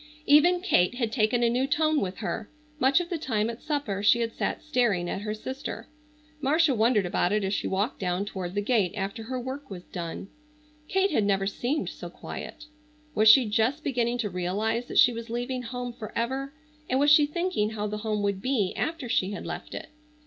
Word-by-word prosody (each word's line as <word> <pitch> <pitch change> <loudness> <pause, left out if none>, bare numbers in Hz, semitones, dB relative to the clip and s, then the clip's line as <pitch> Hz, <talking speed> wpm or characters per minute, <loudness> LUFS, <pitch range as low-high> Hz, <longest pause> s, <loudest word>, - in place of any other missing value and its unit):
Even 345 +5 +5
Kate 245 - +2
had 235 -3 -1
taken 235 0 +2
a 235 - +4
new 255 +3 +1
tone 310 +1 +2
with 185 -1 -3
her. 220 - -3 0.3
Much 275 +3 +4
of 350 -1 -4
the 340 - -1
time 225 -6 0
at 230 - -11
supper 285 -10 -2
she 220 +3 +5
had 230 -1 -1
sat - - -2
staring 240 - +1
at 190 - -3
her 210 0 -3
sister. 260 +5 -6 0.5
Marcia 300 +2 +3
wondered 220 -3 +3
about 175 +1 +1
it 210 0 +1
as 190 +1 -1
she - - -1
walked 200 +6 -1
down 180 +1 -1
toward 185 -2 -5
the 205 - +1
gate 205 -5 +2
after 195 +2 -3
her 255 +3 -4
work 265 +3 -6
was 180 -3 -8
done. 170 +1 -6 0.6
Kate 385 +3 +2
had 225 - +2
never 195 -1 +1
seemed 245 +9 -1
so - - -8
quiet. 305 - -8 0.5
Was 215 +1 +5
she 255 +3 +8
just 225 +8 +1
beginning 245 -3 0
to 225 -4 -1
realize 210 +7 -1
that - - -4
she 245 - +7
was 230 0 -7
leaving 245 +2 -2
home 245 0 -5
forever, 240 +4 -3 0.4
and 260 - +2
was 290 +1 +5
she 295 0 +7
thinking 340 - -1
how 215 -1 -4
the 210 0 -3
home 210 -1 -1
would 200 -1 -1
be 230 -7 0
after 315 -5 -2
she 200 -3 0
had - - -6
left - - -6
it? - - -7
230 Hz, 205 wpm, -27 LUFS, 205-270 Hz, 0.6 s, she